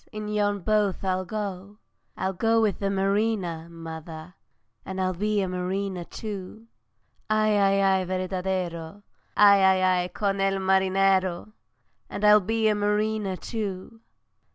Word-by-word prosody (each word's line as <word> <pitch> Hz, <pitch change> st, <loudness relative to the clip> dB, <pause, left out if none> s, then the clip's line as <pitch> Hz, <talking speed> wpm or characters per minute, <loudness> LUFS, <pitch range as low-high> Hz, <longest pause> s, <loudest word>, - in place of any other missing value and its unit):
in 215 Hz, 0 st, -6 dB
yon 205 Hz, -1 st, 0 dB
boat 210 Hz, 0 st, 0 dB
I'll 185 Hz, -1 st, -1 dB
go; 200 Hz, 0 st, -5 dB, 0.4 s
I'll 190 Hz, 0 st, -1 dB
go 225 Hz, +5 st, +2 dB
with 215 Hz, -3 st, +1 dB
the 200 Hz, -, -1 dB
mariner, 195 Hz, -4 st, -1 dB
mother, 165 Hz, 0 st, -9 dB, 0.5 s
And 190 Hz, 0 st, -6 dB
I'll 185 Hz, 0 st, 0 dB
be 210 Hz, +3 st, 0 dB
a 190 Hz, -, -1 dB
mariner 185 Hz, 0 st, -3 dB
too. 210 Hz, +2 st, -8 dB, 0.6 s
Ay, 215 Hz, 0 st, +2 dB
ay, 195 Hz, -1 st, +3 dB, 0.2 s
ay, 185 Hz, -, -3 dB
verdadero, 185 Hz, -1 st, -3 dB, 0.3 s
Ay, 200 Hz, -1 st, +7 dB, 0.2 s
ay, 180 Hz, -1 st, +2 dB
con 195 Hz, +2 st, -2 dB
el 195 Hz, 0 st, +1 dB
marinero! 190 Hz, 0 st, +1 dB, 0.6 s
And 210 Hz, -, -3 dB
I'll 210 Hz, 0 st, +8 dB
be 220 Hz, +3 st, 0 dB
a 215 Hz, -, +3 dB
mariner 210 Hz, -1 st, 0 dB
too! 205 Hz, +2 st, -6 dB
195 Hz, 130 wpm, -25 LUFS, 185-210 Hz, 0.6 s, I'll